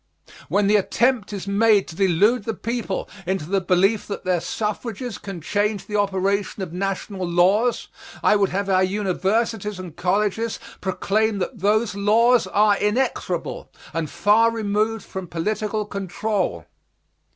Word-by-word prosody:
When 200 Hz, +5 st, +2 dB
the 210 Hz, +1 st, +5 dB
attempt 235 Hz, +2 st, +1 dB
is 200 Hz, -2 st, -5 dB
made 205 Hz, 0 st, +3 dB
to 160 Hz, -, -9 dB
delude 200 Hz, +5 st, +3 dB
the 225 Hz, -, -2 dB
people 230 Hz, -3 st, -3 dB, 0.2 s
into 190 Hz, -4 st, -1 dB
the 195 Hz, +3 st, 0 dB
belief 190 Hz, +4 st, +2 dB
that 200 Hz, -, -6 dB
their 180 Hz, -2 st, +1 dB
suffrages 225 Hz, +4 st, -4 dB
can 195 Hz, -4 st, -7 dB
change 205 Hz, +4 st, -1 dB
the 210 Hz, -, -5 dB
operation 200 Hz, 0 st, 0 dB
of 170 Hz, -, -7 dB
national 195 Hz, +1 st, -3 dB
laws, 190 Hz, +8 st, +2 dB, 0.4 s
I -, -, +5 dB
would 200 Hz, -2 st, +2 dB
have 200 Hz, +2 st, -2 dB
our 190 Hz, -1 st, +3 dB
universities 205 Hz, +2 st, -1 dB
and 180 Hz, -4 st, -8 dB
colleges 210 Hz, +4 st, 0 dB, 0.2 s
proclaim 210 Hz, +3 st, 0 dB
that 200 Hz, +5 st, -4 dB
those 210 Hz, +2 st, +2 dB
laws 225 Hz, +4 st, +3 dB
are 210 Hz, -1 st, +3 dB
inexorable 210 Hz, -6 st, -1 dB, 0.2 s
and 165 Hz, -2 st, -2 dB
far 220 Hz, +3 st, +4 dB
removed 220 Hz, 0 st, -1 dB
from 190 Hz, -1 st, -6 dB
political 210 Hz, +5 st, -2 dB
control. 195 Hz, -, -2 dB
200 Hz, 140 wpm, -22 LUFS, 190-215 Hz, 0.4 s, the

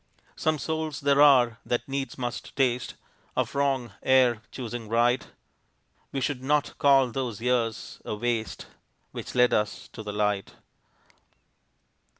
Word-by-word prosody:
Some 155 Hz, 0 st, 0 dB
souls 160 Hz, -1 st, -3 dB
there 140 Hz, 0 st, +4 dB
are 125 Hz, -5 st, +6 dB
that 120 Hz, 0 st, -2 dB
needs 135 Hz, 0 st, -3 dB
must 120 Hz, -2 st, -5 dB
taste 125 Hz, -3 st, 0 dB, 0.4 s
Of -, -, -1 dB
wrong, 135 Hz, -4 st, 0 dB
ere 125 Hz, -4 st, +4 dB
choosing 120 Hz, -3 st, -6 dB
right; 120 Hz, +3 st, +2 dB, 0.8 s
We 135 Hz, -, -2 dB
should 130 Hz, 0 st, -1 dB
not 145 Hz, +2 st, 0 dB
call 135 Hz, -3 st, +5 dB
those 120 Hz, -5 st, -3 dB
years 115 Hz, -2 st, -1 dB
a -, -, -4 dB
waste 115 Hz, 0 st, -2 dB, 0.5 s
Which -, -, -7 dB
led 125 Hz, 0 st, +4 dB
us 105 Hz, -1 st, -1 dB
to -, -, -9 dB
the 105 Hz, -1 st, -5 dB
light. 105 Hz, -1 st, -1 dB
125 Hz, 135 wpm, -27 LUFS, 115-135 Hz, 0.8 s, are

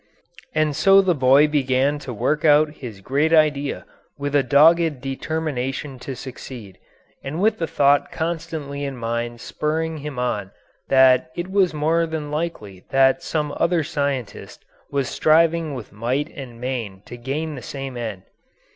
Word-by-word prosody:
] 175 Hz, 0 st, -22 dB
And 155 Hz, -2 st, +1 dB
so 195 Hz, +5 st, +6 dB
the 190 Hz, -2 st, +3 dB
boy 135 Hz, +1 st, +5 dB
began 140 Hz, 0 st, +1 dB
to 135 Hz, -3 st, -7 dB
work 150 Hz, +7 st, -1 dB
out 150 Hz, 0 st, +5 dB
his 110 Hz, -7 st, -9 dB
great 145 Hz, +9 st, +1 dB
idea 150 Hz, -3 st, +2 dB, 0.3 s
with 145 Hz, 0 st, -3 dB
a 145 Hz, -, +5 dB
dogged 155 Hz, +3 st, +4 dB
determination 135 Hz, -1 st, -3 dB
to 130 Hz, +1 st, -6 dB
succeed, 120 Hz, -6 st, -9 dB, 0.4 s
and 145 Hz, +4 st, -4 dB
with 215 Hz, +2 st, +2 dB
the 165 Hz, -, -1 dB
thought 145 Hz, -2 st, +2 dB
constantly 160 Hz, -4 st, -4 dB
in 140 Hz, -2 st, -4 dB
mind 120 Hz, 0 st, -3 dB
spurring 160 Hz, +1 st, -2 dB
him 145 Hz, -2 st, -7 dB
on 105 Hz, -6 st, -2 dB, 0.4 s
that 130 Hz, +3 st, +5 dB
it 175 Hz, +2 st, -5 dB
was 190 Hz, -5 st, +2 dB
more 165 Hz, +3 st, +1 dB
than 155 Hz, -2 st, -5 dB
likely 130 Hz, -, -4 dB
that 135 Hz, 0 st, +3 dB
some 150 Hz, -2 st, -2 dB
other 170 Hz, -1 st, +2 dB
scientist 140 Hz, -6 st, -4 dB, 0.2 s
was 140 Hz, -2 st, -1 dB
striving 160 Hz, -1 st, +2 dB
with 120 Hz, -5 st, -8 dB
might 125 Hz, +8 st, -2 dB
and 125 Hz, -4 st, -9 dB
main 115 Hz, -7 st, -4 dB
to -, -, -9 dB
gain 140 Hz, +6 st, -4 dB
the 130 Hz, -, -7 dB
same 135 Hz, -1 st, -6 dB
end. 110 Hz, -6 st, -5 dB
145 Hz, 155 wpm, -22 LUFS, 130-160 Hz, 0.4 s, so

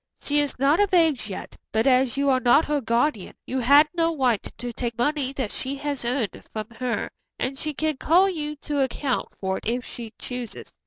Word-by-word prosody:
She 290 Hz, 0 st, 0 dB
is 290 Hz, -2 st, -1 dB
not 275 Hz, +6 st, +3 dB
of 400 Hz, -2 st, +3 dB
age 315 Hz, -10 st, +3 dB
yet, 190 Hz, -, -7 dB, 0.2 s
but 220 Hz, +2 st, +1 dB
as 260 Hz, -1 st, +3 dB
you 280 Hz, 0 st, +1 dB
are 260 Hz, -, +3 dB
not 255 Hz, +6 st, +5 dB
her 295 Hz, -1 st, 0 dB
guardian, 235 Hz, -2 st, 0 dB
you 260 Hz, -, -2 dB
had 285 Hz, +5 st, +6 dB
no 330 Hz, -2 st, +1 dB
right 245 Hz, -6 st, +2 dB, 0.2 s
to 245 Hz, 0 st, -5 dB
take 235 Hz, -1 st, -3 dB
money 275 Hz, +1 st, 0 dB
that 260 Hz, -6 st, -3 dB
she 270 Hz, +1 st, -4 dB
has 285 Hz, -2 st, -3 dB
earned 240 Hz, -3 st, -2 dB
from 215 Hz, +1 st, -5 dB
her, 240 Hz, +1 st, -3 dB, 0.3 s
and 265 Hz, +2 st, -2 dB
she 305 Hz, +2 st, -4 dB
can 310 Hz, -1 st, -1 dB
call 355 Hz, +8 st, +4 dB
you 300 Hz, -5 st, -3 dB
to 290 Hz, -2 st, 0 dB
account 265 Hz, -1 st, -1 dB
for 190 Hz, -1 st, -1 dB
it -, -, -9 dB
if 245 Hz, +2 st, -1 dB
she 230 Hz, -2 st, -8 dB
chooses. 245 Hz, -2 st, -7 dB
265 Hz, 210 wpm, -25 LUFS, 240-295 Hz, 0.3 s, had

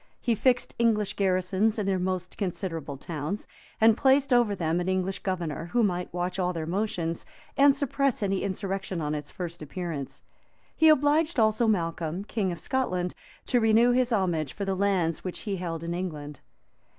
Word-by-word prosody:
He 235 Hz, -, +1 dB
fixed 245 Hz, +3 st, +1 dB
English 220 Hz, -3 st, +2 dB
garrisons 190 Hz, +3 st, +1 dB
in 210 Hz, -, -1 dB
their 195 Hz, -1 st, +1 dB
most 185 Hz, 0 st, -2 dB
considerable 165 Hz, -7 st, -4 dB
towns, 160 Hz, +7 st, -4 dB, 0.3 s
and 225 Hz, 0 st, +6 dB
placed 270 Hz, +1 st, +3 dB
over 235 Hz, -4 st, +4 dB
them 165 Hz, -1 st, 0 dB
an 180 Hz, +1 st, -1 dB
English 185 Hz, 0 st, -1 dB
governor, 170 Hz, -4 st, -3 dB
who 240 Hz, -1 st, +4 dB
might 180 Hz, -3 st, -1 dB
watch 180 Hz, +2 st, -2 dB
all 180 Hz, -1 st, +1 dB
their 165 Hz, -2 st, -3 dB
motions, 170 Hz, -2 st, -2 dB, 0.3 s
and 280 Hz, 0 st, +6 dB
suppress 275 Hz, -4 st, 0 dB
any 195 Hz, -1 st, 0 dB
insurrection 195 Hz, -1 st, -3 dB
on 150 Hz, -1 st, -2 dB
its 150 Hz, -1 st, -4 dB
first 170 Hz, -2 st, -6 dB
appearance. 155 Hz, -2 st, -5 dB, 0.5 s
He 320 Hz, -, +6 dB
obliged 305 Hz, +1 st, +3 dB
also 220 Hz, +1 st, +3 dB
Malcolm, 170 Hz, -3 st, -1 dB
king 205 Hz, -3 st, -1 dB
of 170 Hz, -, -6 dB
Scotland, 180 Hz, -7 st, -1 dB, 0.3 s
to 245 Hz, -, +2 dB
renew 225 Hz, +2 st, +5 dB
his 250 Hz, 0 st, +2 dB
homage 175 Hz, -, 0 dB
for 200 Hz, -, -4 dB
the 195 Hz, -, 0 dB
lands 185 Hz, -4 st, +1 dB
which 185 Hz, -, -5 dB
he 200 Hz, -3 st, -3 dB
held 165 Hz, -2 st, -4 dB
in 170 Hz, +1 st, -3 dB
England. 150 Hz, -6 st, -5 dB
190 Hz, 175 wpm, -27 LUFS, 170-220 Hz, 0.5 s, and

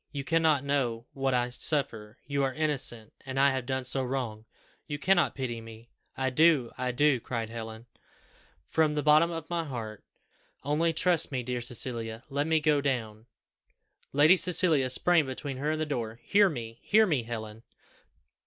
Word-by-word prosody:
You 140 Hz, -1 st, -4 dB
cannot 160 Hz, -2 st, +2 dB
know 125 Hz, -5 st, -1 dB
what 135 Hz, -1 st, 0 dB
I 125 Hz, 0 st, 0 dB
suffer 120 Hz, -5 st, -2 dB
you 140 Hz, -1 st, -1 dB
are 135 Hz, -1 st, -1 dB
innocent 135 Hz, -8 st, -1 dB
and 135 Hz, -1 st, -4 dB
I 140 Hz, 0 st, +5 dB
have 130 Hz, -2 st, -3 dB
done 130 Hz, -1 st, -2 dB
so 130 Hz, +2 st, 0 dB
wrong! 125 Hz, -4 st, -4 dB, 0.4 s
You 145 Hz, -, -4 dB
cannot 175 Hz, +3 st, +2 dB
pity 120 Hz, -4 st, -4 dB
me." 115 Hz, +1 st, -13 dB, 0.3 s
"I 130 Hz, 0 st, 0 dB
do, 150 Hz, -4 st, +3 dB
I 125 Hz, 0 st, -2 dB
do," 135 Hz, +1 st, +2 dB
cried 115 Hz, -1 st, -4 dB
Helen, 110 Hz, 0 st, -7 dB, 0.8 s
"from 155 Hz, -2 st, +1 dB
the 150 Hz, -, -1 dB
bottom 155 Hz, +2 st, +5 dB
of 165 Hz, -1 st, -6 dB
my 170 Hz, -1 st, -2 dB
heart. 115 Hz, -8 st, -7 dB, 0.6 s
Only 155 Hz, +4 st, +1 dB
trust 165 Hz, 0 st, +2 dB
me, 130 Hz, -2 st, -2 dB
dear 125 Hz, 0 st, -3 dB
Cecilia; 115 Hz, -1 st, -3 dB
let 145 Hz, +2 st, -1 dB
me 160 Hz, -1 st, +3 dB
go 150 Hz, -1 st, +2 dB
down 115 Hz, -5 st, -3 dB, 0.4 s
" -, -, -42 dB
Lady 155 Hz, +6 st, +5 dB
Cecilia 165 Hz, -7 st, +3 dB
sprang 160 Hz, +3 st, +3 dB
between 130 Hz, +1 st, -5 dB
her 145 Hz, +3 st, -2 dB
and 155 Hz, 0 st, -1 dB
the -, -, 0 dB
door. 115 Hz, -6 st, -4 dB
"Hear 205 Hz, -1 st, +4 dB
Me! 115 Hz, -6 st, -7 dB
hear 220 Hz, +1 st, +4 dB
me, 150 Hz, -, +1 dB
Helen! 110 Hz, -1 st, -7 dB
135 Hz, 175 wpm, -28 LUFS, 120-150 Hz, 0.8 s, I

